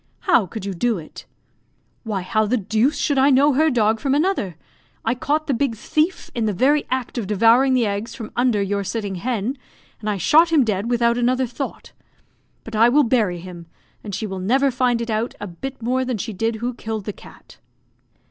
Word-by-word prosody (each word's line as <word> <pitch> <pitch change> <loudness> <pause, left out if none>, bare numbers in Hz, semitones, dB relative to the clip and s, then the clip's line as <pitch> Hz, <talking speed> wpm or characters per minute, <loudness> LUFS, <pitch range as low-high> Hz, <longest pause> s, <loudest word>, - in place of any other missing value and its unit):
How 240 - +3
could 200 +2 -7
you 200 - -3
do 230 +4 0
it?" 155 -2 -11 0.7
"Why, 210 -5 -3
how 215 +3 +1
the 250 +4 +1
deuce 220 - +1
should 285 -2 +1
I 270 +2 +5
know 280 +2 +4
her 310 +4 +3
dog 225 -4 +2
from 275 +2 0
another? 295 - 0 0.5
I 225 - +2
caught 295 +5 -1
the 285 - 0
big 250 -1 0
thief 310 - -1
in 230 -2 -1
the 210 - 0
very 285 +9 +2
act 255 -1 -2
of 210 - -4
devouring 230 +6 +4
the 245 -2 +2
eggs 205 +3 -3
from 225 -4 -8
under 240 -4 +2
your 200 0 -1
sitting 205 0 -3
hen, 240 +6 -3 0.4
and 215 - -4
I 205 - -1
shot 320 - +4
him 305 -5 +5
dead 210 0 -1
without 235 0 +2
another 255 +2 +1
thought. 250 +3 -6 0.7
But 225 - -8
I 230 +2 +5
will 290 +4 +4
bury 225 -8 +1
him, 175 -2 -10 0.4
and 205 -3 -5
she 215 - -3
will 190 -2 -5
never 265 +9 +2
find 245 -1 +1
it 235 -1 -3
out 220 +2 -2
a 205 - -5
bit 245 +8 -8
more 255 +2 +1
than 255 -3 -2
she 220 +2 -5
did 225 +4 -1
who 240 +3 -3
killed 220 -3 -5
the 210 - -4
cat." - - -16
235 Hz, 210 wpm, -21 LUFS, 210-260 Hz, 0.7 s, I